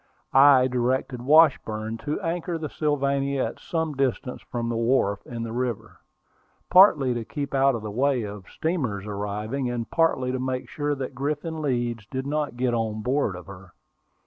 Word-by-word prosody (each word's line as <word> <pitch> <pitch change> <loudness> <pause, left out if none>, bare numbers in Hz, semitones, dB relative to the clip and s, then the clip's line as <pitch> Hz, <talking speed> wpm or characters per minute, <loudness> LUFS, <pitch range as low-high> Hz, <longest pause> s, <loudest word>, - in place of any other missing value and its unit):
I 135 -1 +7
directed 125 0 -1
Washburn 120 -7 +3
to 150 +1 -3
anchor 170 0 -2
the 155 -2 -5
Sylvania 140 -2 0
at - - -6
some 160 -2 -2
distance 130 -1 -2
from 120 -1 -4
the 115 - -2
wharf 115 -4 +1
in 115 -2 -5
the 115 - -5
river, 120 -2 -3 0.7
partly 155 -9 +6
to 120 -1 -3
keep 140 +5 -5
out 135 -1 +3
of 110 - -5
the 105 - -5
way 130 +2 +1
of 100 -2 -8
steamers 125 - -2
arriving, 105 +5 -3
and 120 -2 -3
partly 145 -6 +2
to 130 - -2
make 130 0 -3
sure 145 -1 -2
that 135 -1 -5
Griffin 150 +4 -3
Leeds 120 -6 -2
did 130 0 -4
not 145 -3 -2
get 125 -1 +1
on 110 -2 -2
board 125 -6 0
of 90 - -9
her. 95 -2 -13
130 Hz, 170 wpm, -25 LUFS, 115-145 Hz, 0.7 s, I